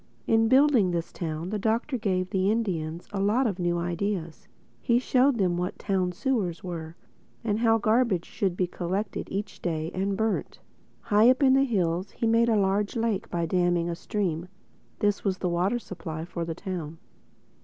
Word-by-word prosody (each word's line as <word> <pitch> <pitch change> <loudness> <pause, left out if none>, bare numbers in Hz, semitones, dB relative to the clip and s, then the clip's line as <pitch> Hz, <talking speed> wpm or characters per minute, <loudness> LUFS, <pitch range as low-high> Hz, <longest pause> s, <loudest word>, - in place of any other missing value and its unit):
In 225 0 +3
building 260 -5 +5
this 170 -1 -2
town 165 +1 -4
the 215 - -1
Doctor 230 +6 0
gave 185 -5 -1
the 190 0 +2
Indians 175 -7 -2
a 200 - -2
lot 215 +7 +2
of 200 -5 -1
new 175 -1 +1
ideas. 175 -1 -3 0.3
He 235 -3 +3
showed 255 +1 +3
them 180 -4 +1
what 180 +2 -3
town 190 -3 0
sewers 190 -4 -1
were, 165 -3 -6 0.5
and 215 -1 0
how 225 -1 +4
garbage 220 -4 +2
should 190 -3 -2
be 185 - +2
collected 185 +3 -3
each 200 +1 -5
day 160 -2 -2
and 195 +1 -1
burnt. 220 0 -1 0.4
High 215 +1 +5
up 260 +2 +3
in 260 -1 +6
the 270 +1 +4
hills 185 -5 -1
he - - -2
made 230 +1 +4
a 225 - +3
large 200 +1 +1
lake 225 -4 -1
by 170 -1 -1
damming 175 0 +1
a - - -3
stream. 175 -3 -2 0.5
This 205 -1 0
was 190 -2 0
the 180 - -1
water 180 +7 +1
supply 165 -7 -6
for 170 -1 -4
the 165 -1 -4
town. 170 -5 -5
195 Hz, 180 wpm, -27 LUFS, 175-225 Hz, 0.5 s, in